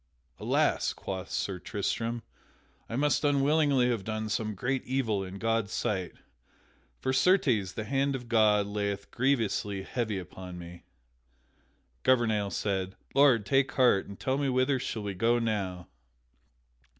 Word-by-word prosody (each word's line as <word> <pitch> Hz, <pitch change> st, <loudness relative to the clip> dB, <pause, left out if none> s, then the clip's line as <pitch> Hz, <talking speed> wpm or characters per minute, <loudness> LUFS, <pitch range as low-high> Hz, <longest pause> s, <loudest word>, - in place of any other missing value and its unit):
"Alas!" -, -, +1 dB
quoth 95 Hz, -1 st, -6 dB
Sir 95 Hz, -2 st, -2 dB
Tristram, 115 Hz, +5 st, -2 dB, 0.7 s
"I 115 Hz, -, -4 dB
must 145 Hz, +4 st, +1 dB
unwittingly 140 Hz, -2 st, +3 dB
have 115 Hz, -5 st, -2 dB
done 110 Hz, +1 st, -3 dB
some 105 Hz, 0 st, -2 dB
great 130 Hz, +7 st, -1 dB
evil 120 Hz, -7 st, -1 dB
in 95 Hz, +1 st, -7 dB
God's 115 Hz, -1 st, 0 dB
sight, 95 Hz, -4 st, -2 dB, 0.8 s
for 130 Hz, -, -1 dB
certes 130 Hz, -, +3 dB
the 110 Hz, -, -4 dB
hand 135 Hz, +4 st, 0 dB
of 125 Hz, -2 st, -7 dB
God 105 Hz, -3 st, +4 dB
lieth 100 Hz, -1 st, -3 dB
grievously 115 Hz, -6 st, 0 dB
heavy 110 Hz, -1 st, -2 dB
upon 90 Hz, 0 st, -8 dB
me." 85 Hz, 0 st, -10 dB, 1.2 s
Gouvernail 110 Hz, -5 st, +2 dB
said: 95 Hz, -2 st, -2 dB, 0.2 s
"Lord, 135 Hz, -6 st, +5 dB
take 135 Hz, +4 st, +2 dB
heart, 125 Hz, -7 st, +3 dB
and 100 Hz, -, -10 dB
tell 135 Hz, +1 st, 0 dB
me 140 Hz, -1 st, +1 dB
whither 130 Hz, +1 st, +2 dB
shall 110 Hz, -3 st, -4 dB
we 100 Hz, -1 st, -3 dB
go 115 Hz, +6 st, +2 dB
now?" 100 Hz, -6 st, -2 dB
110 Hz, 140 wpm, -29 LUFS, 100-130 Hz, 1.2 s, Lord